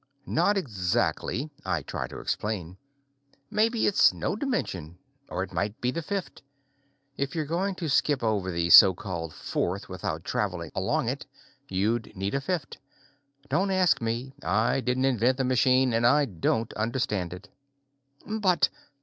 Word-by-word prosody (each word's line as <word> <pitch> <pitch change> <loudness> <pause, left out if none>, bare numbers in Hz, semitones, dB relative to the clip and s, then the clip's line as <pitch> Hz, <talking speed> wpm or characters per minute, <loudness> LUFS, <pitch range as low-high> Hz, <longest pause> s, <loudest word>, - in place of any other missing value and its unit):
"Not 200 +5 +2
exactly," 120 - -1
I - - -1
try - - -4
to - - -9
explain. 95 -5 -3 0.8
"Maybe 225 +2 +2
it's 200 - +5
no - - -2
dimension 95 - -3 0.3
or 90 - -2
it - - -9
might 100 +2 -2
be 125 - 0
the 170 - -3
fifth; 195 +3 -4 0.8
if 140 +4 -2
you're 155 -2 -1
going 185 +6 -1
to 170 -3 -4
skip 145 -2 +2
over 105 -4 0
the 85 -1 0
so 95 +2 +10
called 85 -4 -5
fourth 100 +6 -3
without 85 -3 -4
traveling 90 -6 -2
along - - 0
it, - - -3 0.4
you'd 105 +4 -1
need 95 +1 -3
a 140 - 0
fifth. 170 -2 -3 0.7
Don't 195 +7 +1
ask 185 -6 +3
me. 115 +4 -3
I 110 +6 +1
didn't 130 +1 0
invent 125 0 +2
the 135 - 0
machine 130 0 +3
and 115 +1 +1
I 145 +5 +5
don't 110 +3 -1
understand 110 -5 -1
it." 95 +3 -10 0.8
"But...." 205 -5 +2
120 Hz, 150 wpm, -27 LUFS, 95-150 Hz, 0.8 s, so